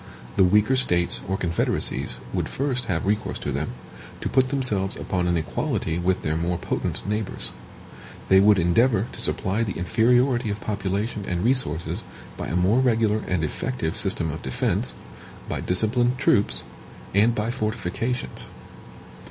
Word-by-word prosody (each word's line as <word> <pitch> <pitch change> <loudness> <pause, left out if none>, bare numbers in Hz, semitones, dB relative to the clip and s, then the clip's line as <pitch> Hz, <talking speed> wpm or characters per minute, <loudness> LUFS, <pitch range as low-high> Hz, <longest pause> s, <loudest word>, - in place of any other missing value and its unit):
The - - +5
weaker 105 +7 +4
States 90 -9 +2
or 95 +1 0
confederacies 85 -6 0 0.2
would - - -1
first 130 -3 -1
have 90 -5 -1
recourse 105 +2 0
to - - -3
them, - - -2 0.5
to - - -2
put 130 -1 +3
themselves 110 -8 -1
upon 90 -2 -1
an 85 -1 +2
equality 80 +1 -1
with 90 +1 0
their 80 - 0
more 85 +2 0
potent - - -3
neighbors. 105 0 -2 0.8
They 95 - +6
would 105 +1 +6
endeavor 100 +5 +3
to - - -6
supply 100 +4 -1
the 105 -4 -2
inferiority 120 +5 +2
of 105 +1 -3
population 100 +1 -2
and 90 0 -1
resources 115 - +1 0.3
by - - -5
a - - -2
more 95 +7 +3
regular 115 -4 +2
and 90 -3 0
effective 80 - -2
system 95 -6 0
of 80 - -6
defense, 65 - -1 0.5
by - - -3
disciplined 120 +6 +1
troops, 105 -6 +2 0.5
and 110 +4 +4
by 110 +2 -1
fortifications. 115 +1 -3
105 Hz, 150 wpm, -24 LUFS, 90-120 Hz, 0.8 s, They